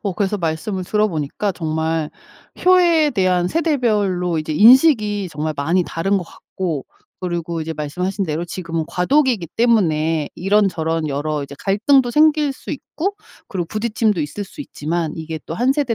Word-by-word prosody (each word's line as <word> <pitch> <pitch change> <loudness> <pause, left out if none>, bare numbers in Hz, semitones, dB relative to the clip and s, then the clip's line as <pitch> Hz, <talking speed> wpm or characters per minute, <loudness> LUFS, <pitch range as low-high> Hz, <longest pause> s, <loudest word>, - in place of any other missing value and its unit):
어 200 -4 -1
그래서 200 +2 -1
말씀을 180 +3 -3
들어보니까 200 -2 -1
정말 160 -1 -2 0.5
효에 345 -4 +5
대한 185 -4 +1
세대별로 210 - 0
이제 155 0 -3
인식이 215 - +5
정말 155 0 -3
많이 165 +6 +1
다른 195 +4 0
것 180 - -6
같고 165 -7 -5 0.4
그리고 170 -2 -3
이제 160 +1 -4
말씀하신 180 +6 -3
대로 160 +1 -2
지금은 165 -2 -4
과도기기 230 - +1
때문에 165 -10 +2
이런저런 170 -5 +1
여러 145 +1 -2
이제 140 0 -9
갈등도 240 +5 +2
생길 300 -1 +4
수 - - -10
있고 365 +7 -4 0.3
그리고 180 -4 -3
부딪힘도 215 -1 0
있을 155 +7 -4
수 245 +10 -12
있지만 165 - -3
이게 160 -1 -5
또 165 - -5
1 250 +8 +2
세대 280 -5 0
185 Hz, 345 characters per minute, -20 LUFS, 160-225 Hz, 0.5 s, 효에